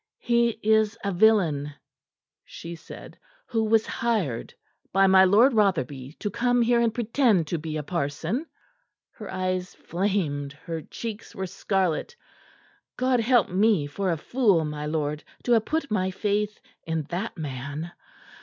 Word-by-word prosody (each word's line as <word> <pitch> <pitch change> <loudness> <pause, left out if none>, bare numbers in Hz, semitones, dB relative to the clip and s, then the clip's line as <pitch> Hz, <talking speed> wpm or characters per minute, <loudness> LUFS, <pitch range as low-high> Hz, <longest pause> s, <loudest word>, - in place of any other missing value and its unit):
"He 235 -1 +2
is 220 0 +3
a 200 - 0
villain," 175 -8 +3 0.7
she 170 - -9
said, 165 - -11 0.3
"who 225 -2 0
was 220 0 +3
hired 200 - -1 0.4
by 195 +1 +4
my 190 0 +7
Lord 225 +8 +5
Rotherby 145 - 0
to 205 +4 -4
come 245 +2 +2
here 235 0 +3
and 230 -1 +2
pretend 230 - +2
to 170 - -1
be 155 0 -4
a 150 - -3
parson." 170 - -2 0.6
Her - - -9
eyes 185 0 -2
flamed, 170 -7 -2
her 160 +2 -6
cheeks 225 +5 -7
were 190 - -3
scarlet. 190 - -1 0.8
"God 255 -1 +2
help 235 -1 +3
me 195 -4 +3
for 185 +7 -2
a 165 - 0
fool, 200 - +2
my 150 0 -4
lord, 150 -1 -2 0.2
to 245 - -1
have 225 -2 +4
put 310 -5 -2
my 190 -3 +1
faith 210 +2 -1 0.2
in 160 -1 -2
that 190 +4 -3
man! 145 +2 -5
190 Hz, 145 wpm, -26 LUFS, 160-225 Hz, 0.8 s, my